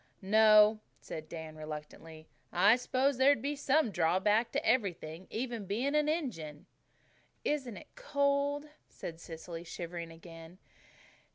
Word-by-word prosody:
"No," 215 +1 +6 0.2
said 155 0 -8
Dan 160 -2 -7
reluctantly. 155 +1 -9 0.2
"I 200 +6 +5
suppose 255 +1 0
there'd 275 -1 +5
be 285 +5 -2
some 285 -3 +2
drawback 190 +7 +2
to - - -1
everything, 185 -7 -1
even 230 -3 -4
being 245 +9 -1
an 300 0 +2
Injun." 165 - -3 0.8
"Isn't 260 -7 -1
it - - -14
cold?" 285 -9 0 0.2
said 165 -1 -8
Cecily, 165 0 -8
shivering 170 0 -6
again. 165 +1 -12
210 Hz, 120 wpm, -32 LUFS, 165-265 Hz, 0.8 s, No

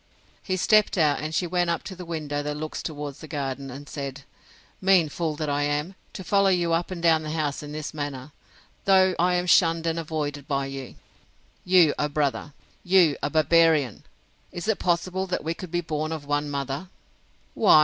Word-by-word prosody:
He 185 -1 -2
stepped 215 +2 +3
out, 150 -4 +3
and 155 +1 -4
she 180 - +1
went 175 0 0
up 170 - -1
to 190 - -7
the 180 0 -8
window 150 -3 -3
that 150 0 -4
looks 155 +1 -5
towards 150 -2 -6
the 155 - -10
garden, 135 -2 -4
and 140 +3 -9
said, 140 -1 -6 0.6
Mean 185 -4 +4
fool 160 0 -2
that 155 0 -3
I 145 0 0
am, 145 +5 -1 0.2
to 190 - -7
follow 200 +2 +3
you 175 -3 +1
up 170 +1 0
and 175 -2 -6
down 165 -2 +4
the 155 - -6
house 150 -2 -2
in 150 -1 -8
this 150 0 -5
manner, 145 -2 -5 0.5
though 190 -1 +5
I 180 +1 +3
am 180 0 0
shunned 165 -2 +4
and 165 0 0
avoided 150 -3 -4
by 140 -2 0
you! 135 -2 -7 0.7
You 180 -5 +5
a 150 - +1
brother!—You 150 +3 +1
a 145 - 0
barbarian! 155 -4 +3 0.5
Is 175 +3 -6
it 220 - +1
possible 185 +2 0
we 165 +2 -1
could 180 +1 -9
be 175 +1 -1
born 155 -1 -3
of 155 -3 -5
one 145 0 -1
mother? 140 +4 -4
155 Hz, 190 wpm, -25 LUFS, 145-175 Hz, 0.7 s, though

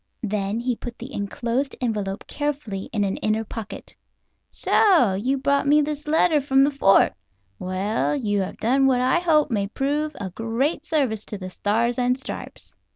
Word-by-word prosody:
Then 210 0 -1
he 245 0 -1
put 240 +1 -8
the 255 +4 -9
enclosed 235 +6 -2
envelope 210 -5 -2
carefully 285 -10 -4
in 210 -3 0
an 195 -1 -1
inner 215 +1 0
pocket. 220 -1 -8 0.5
"So 340 - +3
you 250 +8 0
brought 280 +1 +1
me 295 +1 +5
this 300 +1 -4
letter 310 0 +3
from 270 0 +3
the 285 - +3
fort. 195 - +4 0.5
Well, 190 +8 -1
you 205 -7 0
have 190 - -5
done 270 +4 +2
what 255 -2 +3
I 260 +7 +3
hope 310 -5 +2
may 200 -3 0
prove 290 +6 -2
a 195 -4 -5
great 245 - -2
service 255 -10 0
to 210 - -6
the 185 -1 -7
Stars 230 +6 0
and 250 0 +2
Stripes. 265 - -7
245 Hz, 170 wpm, -23 LUFS, 210-280 Hz, 0.5 s, me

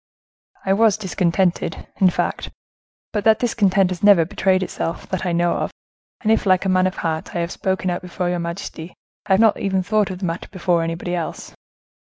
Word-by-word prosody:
"I 190 - +3
was 215 0 +4
discontented, 180 -3 0
in 190 - +5
fact; - - -2 0.6
but 210 -2 -1
that 220 0 +5
discontent 195 -5 +2
has 180 - -5
never 200 -5 +6
betrayed 185 +2 +1
itself, 165 - -4
that 185 0 -2
I - - 0
know 170 0 +2
of, - - -2 0.5
and 220 - +1
if, 225 - +2
like 185 0 +3
a - - +1
man 185 0 +3
of 185 - -4
heart, 160 -1 -3
I - - 0
have 170 +1 -3
spoken 190 -1 -1
out 175 - -3
before 180 0 -4
your 175 0 -1
majesty, 170 -1 -6 0.3
I 190 - +3
have 190 - +4
not 220 -2 +4
even 190 -1 0
thought 210 +1 +1
of 185 - -5
the 185 - -4
matter 165 0 -4
before 175 -3 +1
anybody 165 +2 -3
else." 170 -3 -4
185 Hz, 205 wpm, -21 LUFS, 175-195 Hz, 0.6 s, never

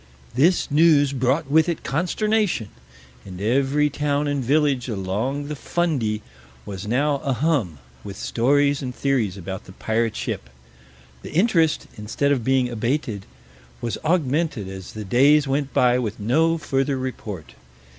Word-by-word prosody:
This 155 +6 +2
news 145 -2 +4
brought 135 +4 +1
with 160 +3 +4
it 170 - -3
consternation, 185 - 0 0.5
and 90 -2 -9
every 135 +7 +2
town 145 +1 0
and 145 -2 -1
village 140 -1 +1
along 110 +8 -2
the 150 - -4
Fundy 135 -10 -1 0.4
was 95 -1 -6
a 140 +3 +1
hum 125 - 0 0.3
with 100 -1 -8
stories 140 +4 +2
and 125 -2 -5
theories 120 -9 0
about 95 +1 -6
the 95 - -12
pirate 110 +2 -1
ship. 60 - -4 0.7
The - - -9
interest, 165 -4 +2
instead 115 +7 -1
of 130 -5 +1
being 130 0 +2
abated, 120 -3 -2 0.5
was 115 - -3
augmented 155 - 0
as 95 -1 -8
the 110 -1 -6
days 140 +8 +4
went 140 0 -1
by 125 0 +3
with 110 -3 -3
no 160 +10 +2
further 135 -2 -1
report. 110 -9 -6
135 Hz, 140 wpm, -23 LUFS, 110-150 Hz, 0.7 s, news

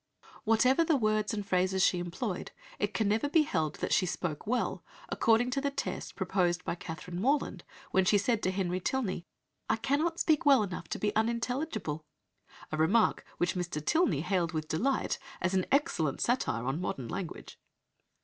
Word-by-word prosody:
Whatever 250 +8 +4
the 325 -1 +3
words 215 -3 +1
and 205 -2 -3
phrases 185 0 +2
she 180 - +2
employed, 175 +3 -4 0.3
it 205 - 0
can 200 +1 0
never 220 +7 +1
be 315 +1 +5
held 160 - -1
that - - -2
she 185 - +3
"spoke 165 -2 -3
well" 245 +2 -1 0.3
according 230 +2 +3
to 275 - 0
the 280 - +1
test 280 - -4
proposed 175 -2 0
by - - -1
Catherine 170 +1 -6
Morland 280 +5 0 0.3
when 190 - +4
she 205 +3 +4
said 220 +2 +1
to 185 - +1
Henry 185 -1 -1
Tilney, 185 -5 -2 0.4
"I - - +4
cannot 285 +9 0
speak 310 -3 +3
well 275 -6 +6
enough 185 -3 -5
to - - -3
be 210 0 -1
unintelligible," 230 - -1 0.7
a 155 - -2
remark 195 +9 +3
which 175 +1 +1
Mr. 175 -4 -3
Tilney 170 - +2
hailed 175 -1 0
with 155 -1 -2
delight 260 +14 0 0.2
as 185 +2 0
"an 185 -1 +1
excellent 275 - +1
satire 180 - 0
on 135 +6 -1
modern 130 -8 -3
language." 170 +8 -6
200 Hz, 175 wpm, -31 LUFS, 175-245 Hz, 0.7 s, well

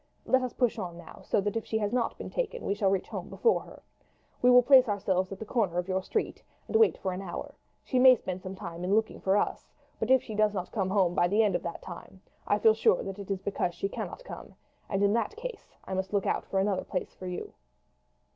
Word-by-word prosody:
Let 260 - +3
us 255 -2 -3
push 245 -3 +1
on 175 -2 -5
now, 170 - -12
so - - 0
that 205 +1 -2
if 225 - -1
she 220 - -2
has 210 0 -1
not 245 -2 0
been - - -7
taken - - -3
we - - +1
shall 200 -1 +1
reach 190 -1 0
home - - -6
before 460 - +2
her. - - -14 0.6
We 250 - +5
will 250 0 +8
place 260 -2 +7
ourselves 190 -2 0
at 195 - -5
the 220 - -7
corner 205 -7 0
of 180 0 -1
your 190 0 0
street 425 - -2 0.3
and - - -5
wait 445 0 +5
for 190 -1 -3
an 185 - -5
hour; 185 -3 -6 0.3
she 255 - 0
may 255 0 +9
spend 185 -5 -5
some 185 +1 -7
time 175 -3 -7
in 190 +3 +2
looking 220 0 0
for 195 +1 +2
us, - - -2 0.3
but 220 - -2
if 260 -1 +5
she 220 - -7
does 210 0 +2
not 185 -2 -4
come 195 -4 -1 0.2
by 175 - +3
the 210 +5 +3
end 210 - +2
of - - 0
that 170 - -6
time 185 +1 -10 0.3
I - - +3
shall 210 - -4
feel 220 - +7
sure 220 -4 +2
that 195 +1 -6
it 200 - -8
is 195 -1 -2
because 180 -3 -1
she 195 - -2
cannot - - -6
come, - - -10 0.3
and 195 0 0
in 200 0 +4
that 235 - 0
case 480 +2 -8
I - - -5
must 190 +1 -3
look 200 -2 +1
out - - 0
for 195 - 0
another 195 -1 0
place 180 - -4
for 185 - -9
you." 180 - -5
200 Hz, 260 wpm, -29 LUFS, 190-230 Hz, 0.6 s, may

